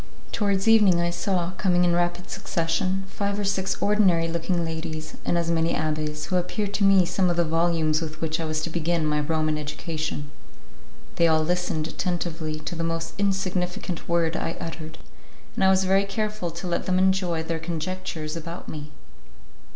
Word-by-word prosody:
Towards 200 -1 +1
evening 210 -6 +6
I 170 0 +1
saw, 180 -1 0
coming 180 -3 +3
in 175 - +3
rapid 175 +1 0
succession, 185 0 -1
five 200 +1 -2
or 205 - -1
six 195 -1 0
ordinary 190 -5 +3
looking 170 +1 -1
ladies, 160 -1 -5
and 175 - +1
as 170 0 0
many 165 0 +2
abbés, 155 -1 -2
who 185 - 0
appeared 200 +3 -2
to 205 - +1
me 195 -2 +6
some 185 +1 +1
of 175 - 0
the 170 - +3
volumes 165 -1 +2
with 155 -1 -5
which 160 0 -1
I 165 - -2
was 155 0 -1
to 170 - -3
begin 170 0 0
my 150 0 +1
Roman 155 0 0
education. 150 -1 -4 0.9
They 170 - +5
all 160 -1 +3
listened 175 -2 0
attentively 165 -3 -2
to 175 - -5
the 165 -1 -3
most 165 0 -2
insignificant 185 -2 -1
word 170 -1 +2
I 165 - -2
uttered, 160 -1 -6 0.6
and - - -1
I - - +6
was 190 0 +4
very 195 +1 +3
careful 210 -2 -2
to 170 +3 -7
let 175 -1 -1
them 185 0 +2
enjoy 185 -3 +2
their 165 0 -2
conjectures 165 -1 -4
about 165 +1 -7
me. 150 -1 -6
170 Hz, 180 wpm, -25 LUFS, 160-185 Hz, 0.9 s, evening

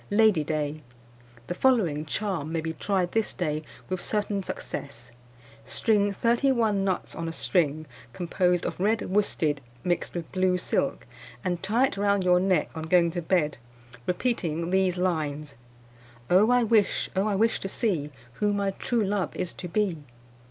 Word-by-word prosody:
"Lady 210 -6 +4
Day. 150 0 -2 0.6
The 175 - -3
following 180 - +2
charm 175 -4 -2
may 165 - 0
be 160 0 -3
tried 185 -1 0
this 225 -1 0
day 155 -4 -1 0.3
with 185 -1 -3
certain 205 -1 -1
success: 140 -9 -7 0.5
String 205 -3 +2
thirty 235 +6 +2
one 220 -6 +2
nuts 190 -1 -1
on 165 - -4
a - - -3
string, 155 -3 0 0.3
composed 180 +3 0
of - - -4
red 215 +4 +1
worsted 160 -8 +1 0.2
mixed 175 0 -1
with 170 -2 -5
blue 185 -1 +2
silk, 180 - -1 0.4
and 175 -2 -1
tie 225 +7 +3
it 260 - -3
round 200 -1 +2
your 180 0 +5
neck 185 -4 +1
on 160 -1 -5
going 170 0 +4
to 175 +1 -3
bed, 160 -5 +1 0.5
repeating 175 -5 -1
these 190 -1 +2
lines: 155 -5 -1 0.8
"Oh, 195 +5 +6
I 245 0 +4
wish! 220 -2 +2
oh, 195 +3 +2
I 205 - +1
wish 225 +3 +2
to 195 - -4
see 180 - -1 0.3
Who 205 0 +3
my 200 -1 0
true 230 +3 -1
love 200 -1 -1
is 180 - -3
to 180 - -7
be! 185 -2 0
185 Hz, 165 wpm, -27 LUFS, 165-205 Hz, 0.8 s, Oh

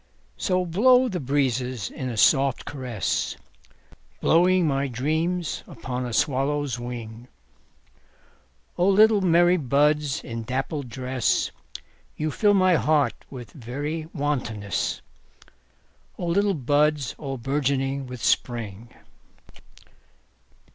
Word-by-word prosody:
So 185 -2 0
blow 250 +9 +4
the 180 - -3
breezes 130 - -1
in 130 - -5
a 115 - -5
soft 135 +4 +3
caress, 125 -7 -2 0.8
Blowing 180 +2 +4
my 140 -2 0
dreams 160 +7 -2
upon 125 0 -5
a - - -5
swallow's 140 -1 0
wing;O 115 - -9
little 210 +1 +5
merry 175 0 +4
buds 150 0 +1
in 115 0 -5
dappled 135 +3 -3
dress, 130 +1 -1 0.7
You 155 0 -1
fill 205 +5 +3
my 185 -3 +4
heart 150 -2 +2 0.2
with 120 -6 -9
very 145 +6 -5
wantonness—O 110 - -6
little 195 +3 +1
buds 145 0 +1
all 135 -2 -4
bourgeoning 135 +1 -1
with 125 -2 -8
Spring! 115 -2 -1
140 Hz, 100 wpm, -24 LUFS, 125-160 Hz, 0.8 s, little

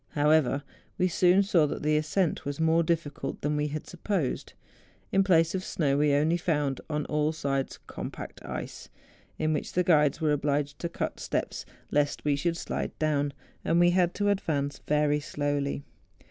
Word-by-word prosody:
However, 145 -2 +3 0.3
we 185 - +3
soon 180 +2 +4
saw 170 -6 +3
that - - -5
the 150 0 +2
ascent 155 +3 0
was 145 +1 -4
more 160 +1 +4
difficult 165 -3 -2
than 150 +1 0
we 150 0 0
had 150 +1 -5
supposed. 175 -5 -2 0.6
In 195 0 +4
place 165 -4 +3
of 190 -1 -2
snow, 140 -7 0
we 145 -1 +3
only 155 +4 +2
found 150 -6 -1
on 150 -1 -1
all 150 0 +1
sides 140 -3 -2
com¬ - - -5
pact - - -9
ice, - - -6 0.5
in 155 0 +1
which 150 - -3
the 180 - +2
guides 150 -5 +3
were 155 -2 +2
obliged 145 0 0
to 170 - -3
cut - - -4
steps - - -3 0.2
lest 145 0 0
we 145 -1 +3
should 165 +4 -1
slide - - -4
down; 145 -2 +1 0.3
and 165 +1 +2
we 175 0 +5
had 175 -1 +2
to 205 0 +1
advance 145 -8 -1
very 150 0 +2
slowly. 145 -1 -2
150 Hz, 175 wpm, -28 LUFS, 145-170 Hz, 0.6 s, we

